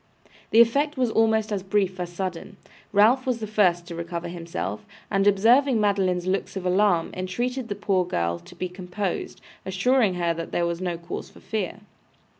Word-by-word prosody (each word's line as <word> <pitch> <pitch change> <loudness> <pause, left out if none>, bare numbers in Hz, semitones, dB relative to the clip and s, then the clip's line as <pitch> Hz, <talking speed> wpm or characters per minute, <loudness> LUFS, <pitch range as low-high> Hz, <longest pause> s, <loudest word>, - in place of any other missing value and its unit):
The 225 - +7
effect 280 +6 +2
was 250 -3 +1
almost 220 -1 +2
as 200 -2 -1
brief 190 -1 0
as 175 -1 -4
sudden. 190 +2 -5 0.3
Ralph 230 +6 +4
was 250 -2 +1
the 220 - -3
first 185 -5 +2
to 170 - -8
recover 170 0 -5
himself, 165 - -5 0.3
and 195 0 +2
observing 235 +6 +4
Madeline's 190 -4 +1
looks 190 +2 -1
of 190 -1 -4
alarm, 180 -2 +2
entreated 240 +7 -3
the 205 - -2
poor 195 -2 +1
girl 85 - -1
to 85 - -15
be 185 - -3
composed, 180 +1 -4 0.2
assuring 200 +2 +2
her 170 -1 0
that 165 0 -6
there 175 - +1
was 170 +1 -2
no 175 -2 -2
cause 170 0 -7
for - - -17
fear. 210 -2 -4
190 Hz, 180 wpm, -25 LUFS, 175-215 Hz, 0.3 s, The